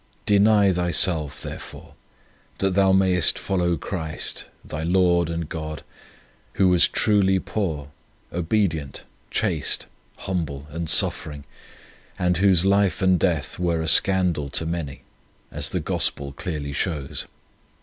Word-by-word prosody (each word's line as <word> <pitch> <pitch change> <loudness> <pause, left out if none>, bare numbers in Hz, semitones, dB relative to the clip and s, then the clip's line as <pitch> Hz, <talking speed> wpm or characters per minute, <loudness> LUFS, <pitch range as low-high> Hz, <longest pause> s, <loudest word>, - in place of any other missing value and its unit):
Deny 105 -1 +4
thyself, 85 -4 +1
therefore, - - -9 0.6
that 95 0 +1
thou 95 0 +3
mayest 95 -2 +3
follow 90 -3 0
Christ, 80 -1 -4 0.2
thy 75 - -5
Lord 85 -1 +2
and 85 -1 -3
God, 80 -1 -6 0.7
Who 95 -2 +3
was 90 -1 +5
truly 100 -3 +2
poor, 80 -8 -3 0.4
obedient, 85 -5 -1 0.3
chaste, - - 0 0.3
humble, 80 -7 -4
and 80 +1 -4
suffering, 75 -3 +2 0.7
and 90 -1 +1
Whose 95 -2 +4
life 100 -1 +2
and 95 -2 +3
death 85 -5 -1
were 85 -2 0
a 80 - -3
scandal 90 -4 +2
to 80 - -1
many, 80 -4 -5 0.5
as - - -2
the - - -2
Gospel 70 -1 -1
clearly 70 -1 -5
shows. 75 -3 -3
85 Hz, 120 wpm, -23 LUFS, 80-95 Hz, 0.7 s, was